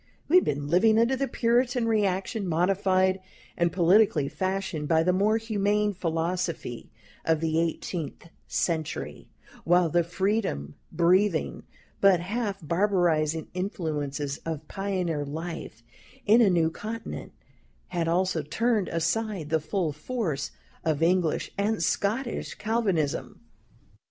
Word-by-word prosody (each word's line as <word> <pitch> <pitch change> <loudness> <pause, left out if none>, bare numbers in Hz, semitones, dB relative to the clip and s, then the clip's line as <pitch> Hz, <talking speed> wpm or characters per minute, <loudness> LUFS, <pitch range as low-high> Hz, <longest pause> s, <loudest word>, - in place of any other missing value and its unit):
We 345 - +6
had 365 - +4
been 145 0 -2
living 215 +8 +4
under 235 +3 +3
the 275 +1 -1
Puritan 240 0 +1
reaction, 200 -1 0
modified 185 +2 +2 0.4
and 170 -1 +1
politically 180 -4 +4
fashioned 185 -5 -2
by 160 0 +3
the 180 +2 +2
more 205 +4 +3
humane 210 -2 0
philosophy 165 - -3 0.3
of 160 -1 +2
the 160 0 0
eighteenth 165 -1 -3 0.2
century, 160 -3 -2 0.3
while 175 0 +4
the 175 +2 +3
freedom 180 - -1 0.2
breathing, 175 +1 +2 0.3
but 195 -3 +5
half 200 +2 -3
barbarizing 170 -4 +1
influences 150 -6 -3
of 160 -2 -5
pioneer 185 -6 -2
life 150 -6 -6 0.4
in 225 +4 +6
a 215 - +5
new 165 -3 +2
continent, 225 +5 -6 0.6
had 170 -2 -1
also 180 0 +1
turned 210 - 0
aside 170 +1 -1
the 160 - +3
full 160 +1 -1
force 155 - -3 0.3
of 155 -1 0
English 175 -1 +1
and 205 -2 +1
Scotch 225 +8 -1
Calvinism. 200 -9 -1
180 Hz, 120 wpm, -27 LUFS, 160-205 Hz, 0.6 s, We